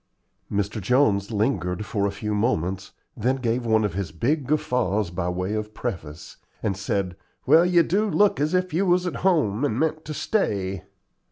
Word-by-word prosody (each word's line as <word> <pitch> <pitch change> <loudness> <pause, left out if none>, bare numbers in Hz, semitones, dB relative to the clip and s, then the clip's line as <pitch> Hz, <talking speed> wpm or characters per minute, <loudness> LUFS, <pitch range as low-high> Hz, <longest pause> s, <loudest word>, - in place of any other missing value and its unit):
Mr. 100 +1 -1
Jones 100 -2 +2
lingered 105 -4 -1
for 100 -1 0
a - - -2
few 105 +1 -4
moments, 95 -4 -1 0.2
then 125 +2 +1
gave 120 -2 -1
one 110 -1 +3
of 105 - -2
his 95 -3 -3
big 130 - -1
guffaws 125 - 0
by 85 0 -2
way 90 +3 -2
of 110 0 -4
preface, 85 -11 -6 0.3
and 100 -3 0
said: 95 -2 -2 0.3
"Well, 160 +6 +6
you 175 -1 +5
do 205 +6 +1
look 205 -8 +3
as 155 +4 +1
if 185 -1 0
you 190 +4 +1
was 180 0 +3
at 175 -5 -3
home 150 - +1
and 130 -5 0
meant 155 0 0
to 155 - -5
stay. 100 - -1
110 Hz, 180 wpm, -24 LUFS, 100-155 Hz, 0.3 s, Well